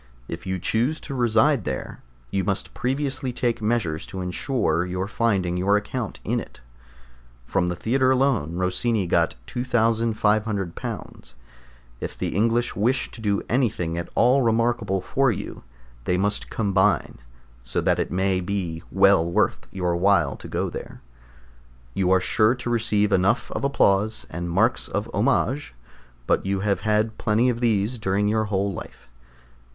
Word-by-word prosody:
If 85 +3 -7
you 95 0 -1
choose 120 - 0
to - - -6
reside 120 +1 +3
there, - - -5 0.3
you 95 - 0
must 100 +2 -2
previously 130 0 -2
take 120 -1 -1
measures 105 -8 0
to 95 - -7
ensure 90 - 0
your 90 +1 -3
finding 100 -6 0
your 100 +3 +3
account 110 +1 -4
in - - 0
it. - - -10 0.9
From 90 +4 0
the 90 - -1
Theatre 130 +8 +1
alone 130 - +1
Rossini 95 +4 0
got 85 - +1
£2500. 110 - -1 0.7
If - - -6
the - - -2
English 115 +3 +1
wish 120 +6 0
to 115 - -10
do 100 -2 0
anything 110 -10 0
at 85 0 -4
all 125 +3 +4
remarkable 115 -4 +1
for 135 +6 +1
you, 105 - -6 0.4
they 90 - +1
must 100 +2 -1
combine, 100 -4 +1 0.4
so - - -2
that - - +1
it - - -1
may 95 0 +1
be 90 -3 -3
well 95 -3 +5
worth - - +1
your 90 -2 -1
while 100 +3 +3
to - - -10
go - - -1
there. - - -8 0.9
You 90 +4 +1
are 95 0 +5
sure 120 +3 +2
to 125 -1 -5
receive 105 -3 +2
enough 100 +6 +2
of - - -4
applause, 110 -6 +2
and 85 +1 -4
marks 110 +8 +2
of 105 +3 -3
homage, 125 - 0 0.5
but - - +1
you 95 0 -1
have 100 -1 +1
had 110 +1 0
plenty 110 +4 +2
of 120 -1 -1
these 115 0 +1
during 100 0 +1
your 110 +1 +1
whole 100 -1 -1
life. - - -10
105 Hz, 155 wpm, -24 LUFS, 95-120 Hz, 0.9 s, well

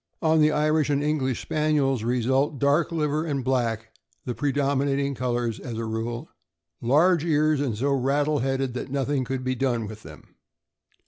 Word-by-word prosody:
On 160 -1 +4
the 150 0 +5
Irish 155 0 +1
and 145 0 +1
English 135 -5 -1
Spaniels; 150 -5 +1
result, 130 +5 +1
dark 145 +5 +2
liver 155 -1 0
and 140 -5 -2
black 115 -3 -1 0.3
the 125 - -2
predominating 140 0 0
colors, 120 -3 -2
as 120 -4 -6
a 115 - -3
rule. 115 +2 -4 0.5
Large 155 +7 +3
ears, 155 -2 +2
and 125 -7 -1
so 140 +5 0
rattle 145 +3 +1
headed 135 0 -1
that 125 - -5
nothing 140 0 -1
could 130 +1 -3
be 130 0 0
done 125 -3 -1
with 110 +1 -9
them. 80 -4 -14
135 Hz, 165 wpm, -25 LUFS, 120-150 Hz, 0.5 s, the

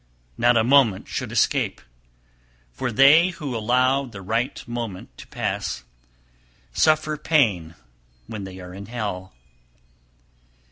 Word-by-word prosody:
Not 120 - +3
a 110 - +4
moment 120 -6 +3
should - - -4
escape, - - +1 0.9
for 90 - -3
they 140 +9 +6
who 150 -8 -5
allow 125 +5 +2
the 105 -6 -10
right 120 +8 -2
moment 115 -6 -6
to - - -11
pass, - - -3 0.9
suffer 155 - +2
pain 105 - +1 0.5
when 105 - -7
they 95 -1 -9
are 90 0 -10
in 100 +1 -9
hell. 100 -5 -5
120 Hz, 120 wpm, -23 LUFS, 95-135 Hz, 0.9 s, they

